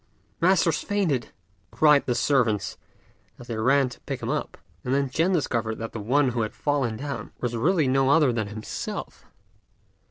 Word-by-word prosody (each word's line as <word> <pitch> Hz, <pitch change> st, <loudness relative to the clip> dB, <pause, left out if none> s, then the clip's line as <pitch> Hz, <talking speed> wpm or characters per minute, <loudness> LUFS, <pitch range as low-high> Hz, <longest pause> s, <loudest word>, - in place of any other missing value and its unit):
"Master's 170 Hz, -3 st, +3 dB
fainted!" 175 Hz, -, -1 dB, 0.4 s
cried 150 Hz, +2 st, +4 dB
the 125 Hz, -, +1 dB
servants, 115 Hz, -9 st, +1 dB, 0.6 s
as 120 Hz, -, -11 dB
they 115 Hz, -, -5 dB
ran 135 Hz, +4 st, +3 dB
to 125 Hz, -, -12 dB
pick -, -, -5 dB
him -, -, -4 dB
up; -, -, -3 dB, 0.3 s
and 125 Hz, +2 st, 0 dB
then 140 Hz, -2 st, 0 dB
Ch'ên 165 Hz, +7 st, +1 dB
discovered 115 Hz, -10 st, -1 dB
that 115 Hz, 0 st, -5 dB
the 115 Hz, -, -5 dB
one 130 Hz, +6 st, +2 dB
who 120 Hz, -1 st, -2 dB
had 110 Hz, -2 st, -3 dB
fallen 135 Hz, -7 st, -1 dB
down 140 Hz, +2 st, -5 dB
was 120 Hz, -1 st, -2 dB
really 160 Hz, +4 st, +2 dB
no 135 Hz, +1 st, +2 dB
other 145 Hz, -4 st, +4 dB
than 110 Hz, -3 st, -2 dB
himself. 110 Hz, +1 st, -6 dB
135 Hz, 170 wpm, -25 LUFS, 115-145 Hz, 0.6 s, cried